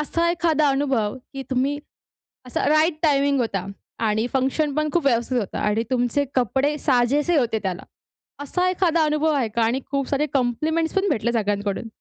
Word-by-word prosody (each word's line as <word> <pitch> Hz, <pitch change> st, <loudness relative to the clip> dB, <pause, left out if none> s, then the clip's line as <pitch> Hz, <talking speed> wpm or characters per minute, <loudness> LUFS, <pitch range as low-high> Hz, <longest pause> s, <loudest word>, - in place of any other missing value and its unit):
असा 335 Hz, +3 st, 0 dB
एखादा 320 Hz, -3 st, +2 dB
अनुभव 270 Hz, -6 st, 0 dB, 0.2 s
की 270 Hz, -, -4 dB
तुम्ही 270 Hz, +3 st, 0 dB, 0.7 s
असा 250 Hz, -, -1 dB
राईट 310 Hz, +1 st, +3 dB
टायमिंग 280 Hz, -2 st, +3 dB
होता 200 Hz, -6 st, -1 dB, 0.4 s
आणि 215 Hz, +3 st, 0 dB
फंक्शनपण 290 Hz, +3 st, 0 dB
खूप 345 Hz, -4 st, +1 dB
व्यवस्थित 245 Hz, -1 st, +1 dB
होता 205 Hz, -, -4 dB
आणि 210 Hz, +2 st, 0 dB
तुमचे 250 Hz, +3 st, +1 dB
कपडे 265 Hz, +4 st, +1 dB
साजेसे 280 Hz, +4 st, +2 dB
होते 230 Hz, -5 st, +1 dB
त्याला, 190 Hz, -1 st, -3 dB, 0.6 s
असा 360 Hz, +6 st, 0 dB
एखादा 340 Hz, -3 st, +2 dB
अनुभव 305 Hz, +1 st, +1 dB
आहे 270 Hz, -5 st, +1 dB
का? 230 Hz, +2 st, -1 dB
आणि 240 Hz, +4 st, 0 dB
खूप 275 Hz, -2 st, -1 dB
सारे 290 Hz, +1 st, +1 dB
कॉम्प्लिमेंट्स 305 Hz, +6 st, 0 dB
पण 390 Hz, +1 st, +2 dB
भेटले 235 Hz, -3 st, 0 dB
सगळ्यांकडून? 205 Hz, -1 st, -1 dB
275 Hz, 160 wpm, -23 LUFS, 235-305 Hz, 0.7 s, राईट